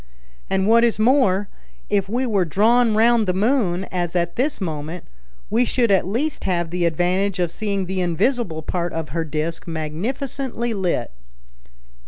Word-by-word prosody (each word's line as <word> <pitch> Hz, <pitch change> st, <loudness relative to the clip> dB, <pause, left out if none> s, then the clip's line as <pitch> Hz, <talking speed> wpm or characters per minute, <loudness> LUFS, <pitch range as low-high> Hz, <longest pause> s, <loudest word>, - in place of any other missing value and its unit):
And 190 Hz, 0 st, +1 dB
what 230 Hz, +1 st, +5 dB
is 235 Hz, -2 st, +2 dB
more, 215 Hz, -4 st, +3 dB, 0.4 s
if 200 Hz, -2 st, 0 dB
we 245 Hz, +4 st, 0 dB
were 205 Hz, -6 st, +2 dB
drawn 220 Hz, +7 st, +3 dB
round 225 Hz, -1 st, +4 dB
the 180 Hz, -, +1 dB
moon, 200 Hz, -4 st, +1 dB
as 175 Hz, -1 st, -2 dB
at 170 Hz, -1 st, 0 dB
this 275 Hz, +4 st, 0 dB
moment, 160 Hz, -1 st, -5 dB, 0.5 s
we 230 Hz, +3 st, +3 dB
should 240 Hz, -2 st, +1 dB
at 190 Hz, -2 st, +3 dB
least 265 Hz, +10 st, -2 dB
have 175 Hz, -3 st, -1 dB
the 175 Hz, -1 st, 0 dB
advantage 180 Hz, +4 st, +1 dB
of 175 Hz, -2 st, 0 dB
seeing 200 Hz, -2 st, -2 dB
the 185 Hz, +1 st, -2 dB
invisible 175 Hz, -, 0 dB
part 175 Hz, +1 st, -2 dB
of 160 Hz, -3 st, -4 dB
her 165 Hz, +4 st, -2 dB
disc 160 Hz, +2 st, -4 dB
magnificently 235 Hz, -, -3 dB
lit." 180 Hz, -, -1 dB
190 Hz, 160 wpm, -21 LUFS, 170-230 Hz, 0.5 s, what